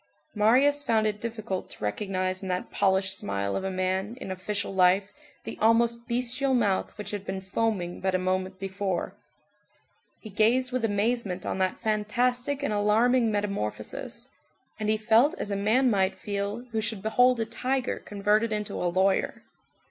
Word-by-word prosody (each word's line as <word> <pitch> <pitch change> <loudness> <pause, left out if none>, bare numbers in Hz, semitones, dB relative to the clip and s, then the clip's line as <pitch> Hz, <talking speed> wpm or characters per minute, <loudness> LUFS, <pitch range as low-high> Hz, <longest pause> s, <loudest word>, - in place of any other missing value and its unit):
Marius 260 +7 +4
found 225 -5 +2
it 210 -1 -1
difficult 220 -5 -4
to - - -10
recognize 185 - -2
in 190 - -5
that 180 0 -3
polished 190 0 +1
smile 100 0 -2
of - - -2
a 190 - -1
man 190 +4 -1
in 190 - -6
official 195 +2 -3
life 190 +2 +3 0.3
the - - -7
almost 235 +1 +3
bestial 255 +3 0
mouth 205 -6 +1
which 210 - -6
had 205 -2 -4
been 190 -1 -4
foaming 190 -2 -2
but 190 -1 0
a - - +4
moment 185 +1 -1
before; 190 -1 -3 1.1
he 215 - -10
gazed 240 +5 +2
with 255 -1 -1
amazement 205 -3 0
on - - -2
that 185 0 0
fantastic 245 +6 0
and 250 - 0
alarming 225 +3 +3
metamorphosis, 200 - -4 0.5
and 215 0 -1
he 215 - +3
felt 230 +9 +4
as 205 - -4
a - - 0
man 220 +7 +3
might 190 -2 +2
feel 205 +4 -3
who 220 -1 0
should 215 -2 -3
behold 245 +3 +4
a 225 - 0
tiger 255 +3 -2
converted 210 +2 0
into 210 -1 -2
a 175 - +1
lawyer. 190 +2 +1
210 Hz, 165 wpm, -27 LUFS, 190-230 Hz, 1.1 s, Marius